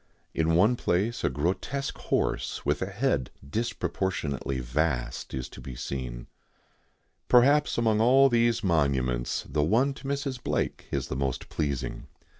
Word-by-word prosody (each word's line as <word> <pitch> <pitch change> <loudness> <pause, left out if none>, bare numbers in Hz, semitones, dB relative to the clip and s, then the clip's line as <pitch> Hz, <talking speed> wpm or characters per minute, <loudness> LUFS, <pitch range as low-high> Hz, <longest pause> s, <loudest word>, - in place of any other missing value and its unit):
In 80 0 +2
one 105 +8 +5
place 110 +3 0
a - - +3
grotesque 95 - -2
horse, - - -1
with 75 0 +1
a 95 - -1
head 100 - 0 0.2
disproportionately 85 - -2
vast, 60 -1 -1
is 65 -2 -3
to - - -11
be 65 - -7
seen. - - -5 1.0
Perhaps 140 +4 +5
among 110 -2 +2
all 135 +4 +6
these 120 -2 +2
monuments 65 -8 +1
the 75 +2 0
one 120 - +3
to 135 - -9
Mrs. 140 -3 -3
Blake - - -2
is 70 -2 -1
the - - -4
most 65 -1 -2
pleasing. 70 -4 -3
85 Hz, 140 wpm, -28 LUFS, -, 1.0 s, all